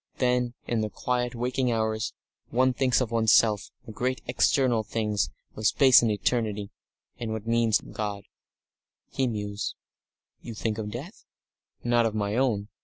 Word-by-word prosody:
Then, 125 Hz, -1 st, +1 dB
in 115 Hz, -2 st, 0 dB
the 110 Hz, -, -1 dB
quiet, 125 Hz, +2 st, -2 dB
waking 125 Hz, +1 st, 0 dB
hours, 110 Hz, -1 st, -1 dB, 0.4 s
one 130 Hz, +2 st, +3 dB
thinks 130 Hz, 0 st, +2 dB
of 120 Hz, -3 st, -2 dB
one's 115 Hz, -1 st, +3 dB
self 105 Hz, -3 st, +4 dB, 0.2 s
and 110 Hz, -, -9 dB
the -, -, -25 dB
great 130 Hz, +1 st, 0 dB
external 130 Hz, -6 st, +2 dB
things, 105 Hz, -6 st, -1 dB, 0.3 s
of 110 Hz, 0 st, +1 dB
space 130 Hz, +1 st, +6 dB
and 115 Hz, -, +2 dB
eternity, 105 Hz, -1 st, -1 dB, 0.5 s
and 115 Hz, -2 st, -3 dB
what 110 Hz, -1 st, -4 dB
one 115 Hz, -, -3 dB
means 115 Hz, -2 st, +3 dB
by -, -, -13 dB
God." 105 Hz, -2 st, -4 dB, 0.9 s
He 130 Hz, -, 0 dB
mused. 105 Hz, -2 st, -3 dB, 0.7 s
"You 115 Hz, -, -8 dB
think 110 Hz, 0 st, -2 dB
of 105 Hz, -1 st, -3 dB
death?" 140 Hz, -, -8 dB, 0.6 s
"Not 120 Hz, -1 st, +3 dB
of 110 Hz, -, -4 dB
my 105 Hz, 0 st, -1 dB
own. 115 Hz, -5 st, 0 dB
115 Hz, 170 wpm, -27 LUFS, 105-125 Hz, 0.9 s, space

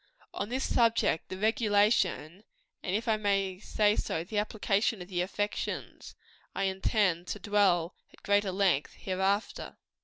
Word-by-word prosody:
_ -, -, -25 dB
On 200 Hz, -, -4 dB
this 260 Hz, +2 st, -2 dB
subject 230 Hz, -8 st, +2 dB
the 185 Hz, -, -5 dB
regulation, 205 Hz, -4 st, +1 dB, 0.4 s
and 185 Hz, -, -2 dB
if 225 Hz, +3 st, -2 dB
I 220 Hz, -1 st, +3 dB
may 195 Hz, -3 st, 0 dB
so 210 Hz, 0 st, +1 dB
say, 160 Hz, -, -2 dB
the 210 Hz, +4 st, -2 dB
application 210 Hz, 0 st, 0 dB
of 180 Hz, +1 st, -9 dB
the 175 Hz, -2 st, -1 dB
affections 205 Hz, +3 st, -4 dB, 0.4 s
I 195 Hz, -, -1 dB
intend 190 Hz, -2 st, +1 dB
to 210 Hz, -, -4 dB
dwell 190 Hz, -4 st, +2 dB, 0.2 s
at -, -, -21 dB
greater 205 Hz, -1 st, +2 dB
length 185 Hz, -6 st, +1 dB
hereafter. 195 Hz, +2 st, -2 dB
200 Hz, 150 wpm, -30 LUFS, 185-210 Hz, 0.4 s, I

